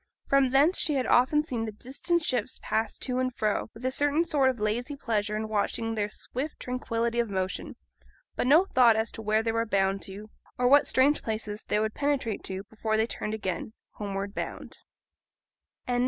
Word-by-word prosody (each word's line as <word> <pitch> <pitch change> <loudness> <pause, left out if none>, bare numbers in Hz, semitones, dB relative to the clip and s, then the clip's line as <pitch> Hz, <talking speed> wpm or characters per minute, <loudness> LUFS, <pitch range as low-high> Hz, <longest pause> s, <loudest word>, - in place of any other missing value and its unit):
From 275 -1 +3
thence 285 +8 +4
she 300 - 0
had 260 -2 +1
often 280 +5 +4
seen 240 -7 -3
the 220 - -4
distant 275 - -1
ships 245 -7 -1
pass 220 -1 -1
to 255 -1 -2
and 255 0 0
fro, 215 0 0
with 235 +3 -9
a 260 - +1
certain 290 +4 +2
sort 275 -5 +3
of 255 -3 -3
lazy 235 +7 -1
pleasure 215 -5 -1
in 220 +1 -2
watching 220 +2 -1
their 210 -1 -1
swift 270 +7 -5
tranquillity 235 -2 -2
of 235 -2 +1
motion, 190 -1 -3 0.6
but - - 0
no 315 +8 +6
thought 245 - +5
as 220 +1 0
to - - -8
where 215 +1 +1
they 225 - 0
were 230 0 +1
bound 195 -2 +1
to, 205 +3 -8 0.3
or 245 - +2
what 285 +3 +6
strange 280 +3 +3
places 215 -1 -4
they 210 - +1
would 215 0 -1
penetrate 280 -7 -1
to 190 0 -4
before 220 +1 -2
they 220 - +3
turned 215 -2 -4
again, 200 +1 -4 0.2
homeward 200 -1 -4
bound. - - -6
230 Hz, 190 wpm, -28 LUFS, 215-260 Hz, 0.6 s, no